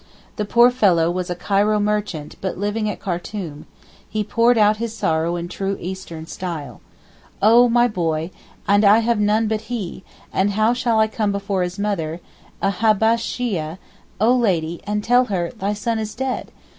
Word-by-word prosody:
The 210 - -1
poor 235 +4 +5
fellow 180 -9 +3
was 180 0 -3
a 175 - -2
Cairo 205 +3 +1
merchant 205 -7 -2
but 190 - -3
living 210 +2 -1
at - - -5
Khartoum, 175 -4 -5 0.4
he 215 -1 -1
poured 230 +3 +3
out 210 0 +4
his 225 0 -4
sorrow 165 0 0
in 175 0 -4
true 195 +2 -3
Eastern 175 -3 -7
style. 160 - -6 0.6
'Oh 235 +4 +6
my 240 +1 +4
boy, 165 -5 -2 0.4
and 205 +1 +4
I 205 +1 +7
have 235 -2 +1
none 210 +2 +2
but 220 +1 -3
he, 200 -6 -4 0.3
and 200 +2 +1
how 215 +3 +3
shall 240 -2 +1
I 220 - +5
come 215 -1 -1
before 200 -1 -2
his 180 +1 -3
mother, 180 -6 -2 0.4
a - - +3
Habbesheeyeh, 220 -5 +1 0.4
oh 230 +5 +4
Lady, 175 -8 0
and 210 0 -2
tell 245 +3 +4
her 180 -6 -2
"thy 205 -3 -2
son 225 +2 -1
is 215 -1 -5
dead"? 260 0 -3
205 Hz, 170 wpm, -21 LUFS, 180-220 Hz, 0.6 s, I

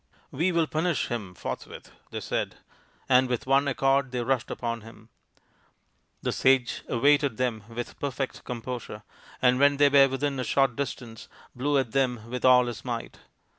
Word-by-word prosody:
" - - -34
We 170 +7 +1
will 170 -2 +2
punish 160 -1 -1
him 105 -6 -5
forthwith," - - -7 0.2
they - - -5
said, - - -2 0.5
and 130 0 +4
with 125 +2 -2
one 135 +2 +3
accord 135 0 +2
they 125 -1 -2
rushed 130 -1 0
upon 115 -1 -3
him. 110 0 -15 1.1
The - - 0
sage 130 -2 +2
awaited 140 0 +3
them 115 -5 -2
with 120 +1 -6
perfect 135 -1 -4
composure, 120 -3 -6 0.4
and 125 0 +4
when 140 0 +4
they 145 0 +5
were 140 -1 +7
within 135 +1 -2
a - - -1
short 135 -2 +2
distance 120 -4 -6 0.3
blew 140 +3 +1
at 130 -4 0
them 125 -4 -1
with 125 - -4
all 125 -1 +6
his 120 -1 -6
might. 120 -2 -5
130 Hz, 170 wpm, -27 LUFS, 120-140 Hz, 1.1 s, were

